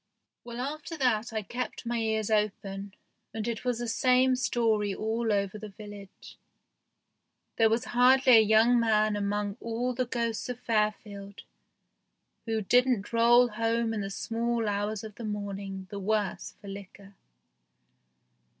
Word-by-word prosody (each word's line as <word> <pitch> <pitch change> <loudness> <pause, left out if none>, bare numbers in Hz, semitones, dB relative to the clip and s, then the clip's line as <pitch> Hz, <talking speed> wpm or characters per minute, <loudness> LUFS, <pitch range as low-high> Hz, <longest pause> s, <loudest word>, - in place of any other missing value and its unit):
Well, 235 0 -8
after 305 +5 -5
that 240 -5 +1
I 220 -1 -3
kept 245 +4 -5
my 235 0 -1
ears 220 -1 -1
open, 200 -2 -2 0.4
and 220 0 -3
it 230 -2 -3
was 250 -2 0
the 240 0 -4
same 255 +2 +3
story 220 -5 0
all 225 +1 -1
over 200 0 -1
the 215 0 -8
village. 205 -1 -12 1.2
There 225 -1 +5
was 225 +1 0
hardly 255 +1 +6
a - - +8
young 220 +3 +4
man 215 -2 +2
among 205 0 -2
all 235 +2 -2
the 250 0 -2
ghosts 235 -1 -2
of 245 -1 -5
Fairfield 210 -3 -2 1.0
who 220 -1 -1
didn't 245 0 +2
roll 240 +1 +5
home 230 +1 0
in 215 - -2
the 195 - -4
small 230 +2 -2
hours 205 +1 -2
of 215 -1 -8
the 235 - -10
morning 200 -2 -5
the 200 - -5
worse 205 -1 -2
for 200 - -13
liquor. 200 0 -10
220 Hz, 145 wpm, -28 LUFS, 205-235 Hz, 1.2 s, a